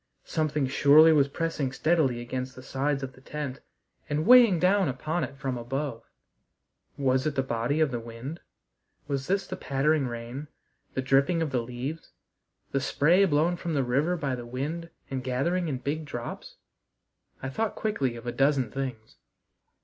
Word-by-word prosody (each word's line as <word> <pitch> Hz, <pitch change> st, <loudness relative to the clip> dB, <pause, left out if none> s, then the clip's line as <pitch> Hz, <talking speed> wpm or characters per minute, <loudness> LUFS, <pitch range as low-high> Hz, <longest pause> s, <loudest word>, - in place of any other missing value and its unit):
Something 150 Hz, -3 st, 0 dB
surely 145 Hz, +4 st, +6 dB
was 140 Hz, -2 st, +4 dB
pressing 150 Hz, -3 st, -2 dB
steadily 135 Hz, -4 st, +1 dB
against 130 Hz, +1 st, -4 dB
the 130 Hz, -, -11 dB
sides 135 Hz, +1 st, -1 dB
of 130 Hz, -1 st, -5 dB
the 130 Hz, -, -18 dB
tent 140 Hz, -1 st, -5 dB, 0.5 s
and 150 Hz, +1 st, 0 dB
weighing 240 Hz, -5 st, +8 dB
down 190 Hz, +2 st, +3 dB
upon 155 Hz, +7 st, -2 dB
it 135 Hz, -, -6 dB
from 130 Hz, -3 st, -3 dB
above. 130 Hz, 0 st, -3 dB, 1.0 s
Was 130 Hz, 0 st, +2 dB
it 150 Hz, -, -2 dB
the 135 Hz, -, +1 dB
body 120 Hz, +4 st, -1 dB
of 155 Hz, -3 st, +3 dB
the 120 Hz, -, -2 dB
wind? 115 Hz, +8 st, -7 dB, 0.7 s
Was 140 Hz, -1 st, -2 dB
this 195 Hz, +1 st, +1 dB
the 185 Hz, -, -5 dB
pattering 140 Hz, -2 st, +1 dB
rain, 120 Hz, +5 st, -6 dB, 0.5 s
the 130 Hz, -, -1 dB
dripping 140 Hz, +6 st, +3 dB
of 155 Hz, -, -3 dB
the 125 Hz, -2 st, +1 dB
leaves? 125 Hz, +7 st, -6 dB, 0.6 s
The 135 Hz, -, 0 dB
spray 170 Hz, +8 st, +4 dB
blown 165 Hz, +1 st, +2 dB
from 170 Hz, -2 st, -3 dB
the 140 Hz, -, +2 dB
river 140 Hz, +8 st, +1 dB
by 140 Hz, -4 st, -2 dB
the 125 Hz, -1 st, -4 dB
wind 150 Hz, +7 st, -4 dB, 0.2 s
and 130 Hz, -1 st, -3 dB
gathering 165 Hz, +8 st, 0 dB
in 140 Hz, -4 st, -2 dB
big 145 Hz, +5 st, -3 dB
drops? 120 Hz, -4 st, -7 dB, 0.9 s
I 135 Hz, -, -2 dB
thought 220 Hz, +10 st, -2 dB
quickly 140 Hz, -, -1 dB
of 115 Hz, 0 st, -10 dB
a 120 Hz, -, -2 dB
dozen 135 Hz, -2 st, +2 dB
things. 125 Hz, -5 st, -5 dB
140 Hz, 170 wpm, -27 LUFS, 130-160 Hz, 1.0 s, weighing